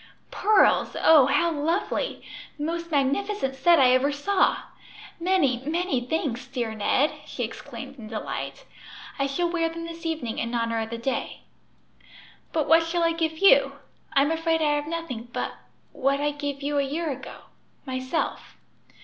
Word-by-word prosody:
"Pearls! 430 0 +3
Oh, 300 -5 +7
how 340 +4 +2
lovely! 330 +10 -1 0.3
the 295 - -5
most 335 +2 -3
magnificent 285 +2 0
set 335 +6 +4
I 255 -2 +6
ever 265 +3 +3
saw. 375 +8 +2 0.6
Many, 335 -9 +2
many 330 -2 0
thanks, 255 -3 -2
dear 235 -3 -3
Ned!" 220 +7 +2 0.2
she 245 - -4
exclaimed 265 +3 -8
in 220 - -9
delight. 215 -1 -5 0.5
"I 275 - +2
shall 345 +6 0
wear 330 -2 0
them 335 0 -7
this 335 0 -9
evening 310 -9 -3
in 235 +1 -2
honor 230 -1 0
of 220 - -4
the 230 - -4
day. 245 +3 -3 1.1
"But 310 -3 0
what 325 +1 +6
shall 335 +1 -1
I 335 - +3
give 325 -1 -1
you? 395 +8 +5 0.4
I'm 280 +3 +3
afraid 325 0 +1
I 295 -1 +3
have 295 0 -2
nothing 315 -8 -5
but - - -3 0.4
what 275 +1 0
I 295 0 +1
gave 285 -1 -5
you 290 0 0
a - - +2
year 305 +3 -2
ago 270 0 -8 0.4
myself." 260 +4 -3
290 Hz, 160 wpm, -25 LUFS, 260-330 Hz, 1.1 s, Oh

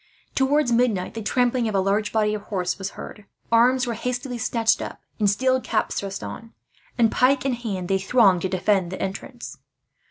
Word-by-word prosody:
Towards 275 0 +2
midnight, 230 -6 +1
the 225 - -5
trampling 245 +2 +1
of 215 - -2
a - - +3
large 200 +2 0
body 215 -1 +1
of 210 - -3
horse 185 -3 -3
was 195 0 -3
heard. 210 - -9 0.3
Arms 245 +3 +4
were 240 - -2
hastily 245 +2 -4
snatched 230 -1 +1
up - - -6 0.2
and 205 -2 +3
steel 260 +5 +1
caps 225 - -1
thrust 195 -1 -5
on 225 +1 -8 0.4
and, 230 -2 +4
pike 260 +1 +2
in 270 - +1
hand, 205 -7 -4
they 195 +1 +1
thronged 195 -3 +4
to 190 - -1
defend 185 -1 +1
the 190 - -6
entrance. 215 +6 -6
225 Hz, 190 wpm, -23 LUFS, 195-245 Hz, 0.4 s, Arms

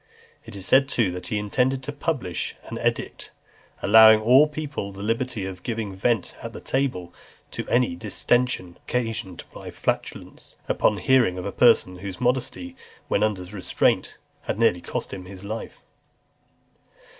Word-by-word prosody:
It - - -10
is 95 -1 -6
said, 135 +4 +4
too, 115 -9 +1
that 90 0 -6
he 110 - -1
intended 125 +6 0
to 145 - -4
publish 140 - -3
an - - -7
edict, - - -2 0.5
"allowing 110 +1 +8
to 110 - -7
all 130 +6 +7
people 145 -9 -5
the 100 +1 -8
liberty 115 -1 -2
of 95 -1 -7
giving 110 -4 -4
vent 105 +1 0
at - - -7
table 125 -11 -1 0.4
to - - -6
any 120 -7 +2
distension 105 -1 0
occasioned 115 -7 -3
by - - -9
flatulence," - - -4
upon 105 - +2
hearing 120 -3 +3
of 90 - -5
a - - -3
person 90 0 +3
whose 95 -1 -7
modesty, 130 - -1 0.3
when - - +1
under 105 -4 0
restraint, 95 0 0 0.2
had - - -3
nearly 110 -6 +3
cost - - -5
him 95 -2 -7
his 95 0 -11
life. 110 +2 -7
110 Hz, 155 wpm, -24 LUFS, 95-125 Hz, 0.5 s, allowing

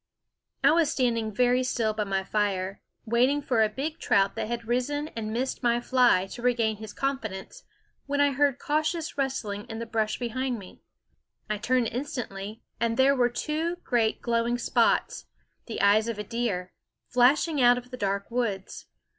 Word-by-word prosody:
I - - +7
was 320 -2 +3
standing 230 -5 0
very 250 +4 +2
still 230 -3 0
by 210 -1 -2
my 195 -1 -1
fire, 195 -2 -1 0.2
waiting 245 +5 +3
for 250 -5 +1
a 215 - +4
big 295 +9 -4
trout 195 0 +2
that - - -3
had 235 0 -4
risen 290 +5 -1
and 215 -5 -5
missed 250 +4 -2
my 240 -1 +2
fly 245 -7 +3
to 240 - -7
regain 230 -3 +1
his 215 0 -8
confidence, 225 -9 -4 0.5
when 285 0 -1
I 285 0 +4
heard 280 -1 +2
cautious 310 +3 -1
rustlings 240 -7 -2
in 225 - -5
the 230 - -4
brush 220 -2 -1
behind 250 +1 -2
me. 195 -4 -12 0.7
I 210 - -1
turned 250 0 +1
instantly, 225 -5 -5 0.2
and 230 0 0
there 270 +1 +5
were 245 -2 +3
two 315 +7 -2
great 230 -3 0
glowing 235 0 +1
spots, 240 - +1 0.4
the 230 - -4
eyes 210 +2 +5
of 230 -2 -3
a 210 - -3
deer, 205 -5 -3 0.3
flashing 275 +4 +3
out 245 0 +6
of 250 0 -8
the 250 - -6
dark 200 0 -2
woods. 220 -6 -3
240 Hz, 170 wpm, -27 LUFS, 215-265 Hz, 0.7 s, I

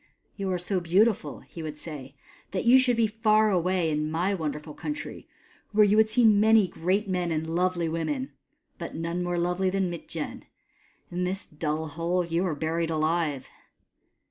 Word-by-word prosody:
" - - -43
You 195 -2 -2
are 180 - 0
so 180 +2 -1
beautiful," 180 -2 +1
he 165 - -10
would 155 -1 -6
say, 145 -4 -9 0.2
" - - -28
that 190 - -1
you 250 +2 +7
should 250 -2 +2
be 230 - +4
far 215 0 +3
away 180 -2 +1
in 150 0 -1
my 175 +5 0
wonderful 150 -3 -4
country, 295 - -6 0.5
where 210 0 +6
you 205 +1 +3
would 220 0 +5
see 240 +2 +3
many 215 -1 +5
great 185 +5 -1
men 180 -2 -1
and 160 0 -1
lovely 180 -1 +1
women; 260 - -2 0.5
but - - -6
none 170 +2 -2
more 175 0 -1
lovely 180 +2 +1
than 190 -1 0
Mitjen, 165 -2 -6 0.7
In 180 +1 -2
this 190 +2 -3
dull 155 +1 -3
hole 170 +4 -1
you 170 +1 0
are 160 - -1
buried 165 +2 -1
alive." 155 -3 0
175 Hz, 180 wpm, -27 LUFS, 160-200 Hz, 0.7 s, you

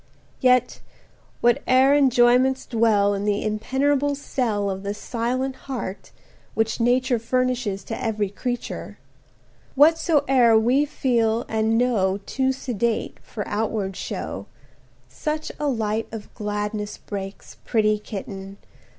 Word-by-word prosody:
Yet, 250 -1 +3 0.6
whate'er 255 +3 +4
enjoyments 260 -1 +4
dwell 220 -4 +3
In 200 0 -2
the 205 0 0
impenetrable 270 +6 +1
cell 235 -7 -1
Of 190 -1 -3
the 200 +1 -3
silent 250 +4 -2
heart 230 -7 -5 0.5
which 225 0 0
Nature 245 +1 +2
Furnishes 245 -4 -1
to 225 +3 -5
every 215 -4 -1
creature; 245 +3 -5 0.8
Whatsoe'er 285 -6 +5
we 250 +6 +3
feel 235 -5 +1
and 220 0 +1
know 210 -6 +2
Too 265 0 0
sedate 235 -3 -2
for 210 - -6
outward 205 -2 -2
show, - - -5 0.6
100 - - -34
Such 310 0 -3
a 295 - 0
light 225 -4 -1
of 220 -2 -8
gladness 210 0 -3
breaks, 195 -1 -7
Pretty 215 -2 +2
Kitten! 195 -2 -7
230 Hz, 115 wpm, -23 LUFS, 210-260 Hz, 0.8 s, Whatsoe'er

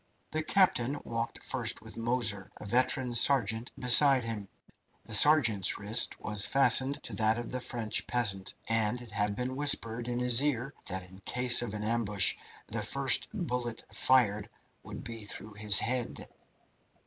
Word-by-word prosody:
The 155 - -3
captain 145 -6 0
walked 115 +1 -6
first 115 -4 -2
with 110 - -13
Moser, 115 -4 0
a - - -11
veteran 125 +2 -1
sergeant, 115 -2 +1
beside 130 +1 +5
him. 110 -4 -6 0.6
The 115 - -8
sergeant's 115 - +4
wrist 105 +3 +2
was 105 -1 -1
fastened 135 +1 +4
to 120 - -7
that 110 +1 +1
of 120 -1 -7
the 130 - -4
French 120 -3 -4
peasant, 100 -6 -2
and 115 +1 +1
it 120 -2 -12
had 105 -1 -2
been 125 +2 -5
whispered 120 -5 0
in 120 0 -4
his 125 0 +4
ear 135 -2 -3
that 95 0 -3
in 95 +1 -15
case 125 +4 +1
of 115 -3 -6
an 105 - -5
ambush 105 -2 +2 0.3
the 115 0 -6
first 135 +5 +1
bullet 125 - -5
fired 105 -5 +1 0.3
would - - -10
be 115 -2 -9
through 105 +1 -8
his 105 -1 +3
head. 125 0 -1
115 Hz, 160 wpm, -29 LUFS, 105-125 Hz, 0.6 s, beside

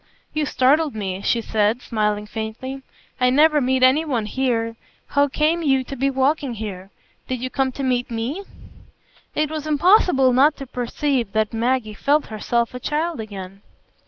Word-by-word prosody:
"You 305 -1 0
startled 285 +1 +2
me," 195 -3 -3
she 230 +3 +1
said, 220 +1 +1
smiling 210 -2 -1
faintly; 225 +5 -6 0.4
"I 250 0 +4
never 300 +3 +4
meet 260 0 +1
any 265 +5 +5
one 250 -9 -1
here. 230 -1 -1 0.3
How 285 0 +3
came 310 +4 +1
you 270 -4 +2
to 275 - -7
be 270 +2 +1
walking 270 -1 0
here? 195 -3 -6 0.4
Did 255 -1 -3
you 255 +1 -4
come 265 -1 0
to 275 - -5
meet 250 -2 0
me?" 240 - -3 0.9
It 305 0 0
was 310 -1 -4
impossible 300 - +4
not 285 +4 +4
to 275 - -7
perceive 250 -2 -2
that 220 0 0
Maggie 230 -1 0
felt 290 +7 +1
herself 235 +3 -1
a 250 - -6
child 310 +3 -2
again. 195 -3 -8
255 Hz, 165 wpm, -22 LUFS, 225-285 Hz, 0.9 s, any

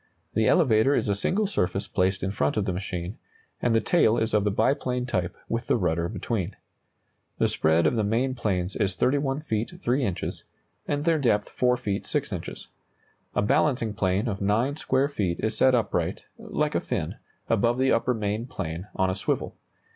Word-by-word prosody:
The 110 0 +2
elevator 130 -3 +4
is 110 - 0
a - - +3
single 190 - 0
surface 95 - -1
placed 95 0 0
in 95 - 0
front 75 -5 0
of 105 - +1
the 95 - -1
machine, 90 +1 -5 0.4
and 120 -2 +2
the - - +5
tail 115 -6 +3
is 110 -1 0
of 105 -2 +3
the 105 - +2
biplane 125 +4 0
type 90 -7 -2
with 115 +1 -2
the - - +3
rudder 85 -3 0
between. 105 -3 -3 0.8
The - - +3
spread 80 +2 +2
of - - +3
the 110 - +1
main 120 +6 +1
planes 95 -6 -1
is 95 -2 0
31 140 +1 +1
feet 110 -6 -2
3 130 +3 +1
inches, 95 -6 -3 0.4
and 145 0 -1
their 165 -2 +3
depth 105 -6 +1
4 125 0 +2
feet 100 -4 -3
6 - - -1
inches. - - -6 0.7
A - - +2
balancing 130 -2 +2
plane 95 +3 0
of 100 -3 -3
9 115 +8 +1
square 135 -2 +1
feet 100 -12 -2
is 110 0 -1
set 130 +2 +5
upright 115 - -1
(like - - -1
a - - +1
fin) - - -3 0.3
above 115 +2 +2
the 130 +1 +3
upper 120 +2 +2
main 110 +2 -2
plane, 85 -4 -5
on 95 0 +2
a - - -2
swivel. 100 - -2
110 Hz, 190 wpm, -26 LUFS, 95-125 Hz, 0.8 s, the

